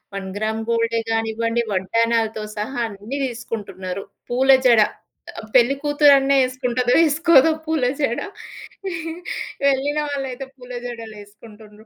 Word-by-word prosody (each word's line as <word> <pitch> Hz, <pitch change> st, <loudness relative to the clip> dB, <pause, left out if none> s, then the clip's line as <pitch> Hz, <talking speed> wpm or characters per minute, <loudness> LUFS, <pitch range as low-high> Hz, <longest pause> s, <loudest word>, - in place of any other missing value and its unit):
One 195 Hz, -1 st, -4 dB
gram 220 Hz, +1 st, -2 dB
గోల్డే 230 Hz, 0 st, +1 dB
గానివ్వండి, 225 Hz, +1 st, 0 dB
వడ్డానాలతో 225 Hz, +3 st, 0 dB, 0.2 s
సహా 230 Hz, +5 st, -3 dB
అన్ని 215 Hz, +6 st, -7 dB
దీసుకుంటున్నరు. 200 Hz, -6 st, -6 dB, 0.3 s
పూల 260 Hz, +2 st, +1 dB, 0.2 s
జడ 235 Hz, -3 st, +6 dB, 0.6 s
ఆ -, -, -6 dB
పెళ్లి 255 Hz, +2 st, +5 dB
కూతురన్న 290 Hz, -2 st, +4 dB
ఏసుకుంటదో 250 Hz, -1 st, 0 dB
ఏసుకోదో 320 Hz, 0 st, +5 dB, 0.2 s
పూల 315 Hz, -4 st, 0 dB, 0.2 s
జడ, 240 Hz, -5 st, 0 dB, 1.5 s
ఎళ్ళిన 280 Hz, +2 st, -1 dB
వాళ్ళైతే 270 Hz, -2 st, -4 dB
పూల 250 Hz, -1 st, -13 dB
జడలేసుకుంటుండ్రు. 215 Hz, -1 st, -11 dB
235 Hz, 105 wpm, -21 LUFS, 220-265 Hz, 1.5 s, జడ